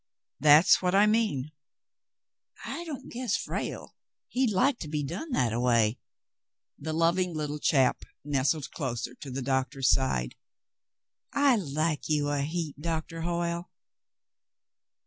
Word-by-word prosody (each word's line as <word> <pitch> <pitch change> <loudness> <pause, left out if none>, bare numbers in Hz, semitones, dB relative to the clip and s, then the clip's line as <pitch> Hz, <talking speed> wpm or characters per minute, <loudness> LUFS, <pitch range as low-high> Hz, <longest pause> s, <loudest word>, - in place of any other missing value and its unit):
"That's 155 +5 +6
what 180 0 +1
I 200 +1 +6
mean." 210 - +1 1.1
"I 340 - -5
don't 300 -6 -7
guess 240 -3 -1
Frale, - - -5 0.4
he'd 255 -1 +1
like 245 +6 +2
to 155 - -6
be 150 0 -2
done 185 - -5
that 120 - +1
a 115 - -1
way." 115 -2 +2 0.8
The 155 +2 -4
loving 170 +2 +1
little 150 -1 -3
chap 135 -3 +2 0.2
nestled 145 +1 0
closer 125 -5 -4
to 135 +2 -10
the 130 +1 -4
doctor's 130 0 +1
side. 65 - 0 1.0
"I 280 -3 +4
like 155 -5 -1
you 150 -1 +1
a 145 -1 0
heap, 155 0 -3
Doctah 165 +1 -3
Hoyle. 170 0 -2
155 Hz, 130 wpm, -28 LUFS, 135-180 Hz, 1.1 s, That's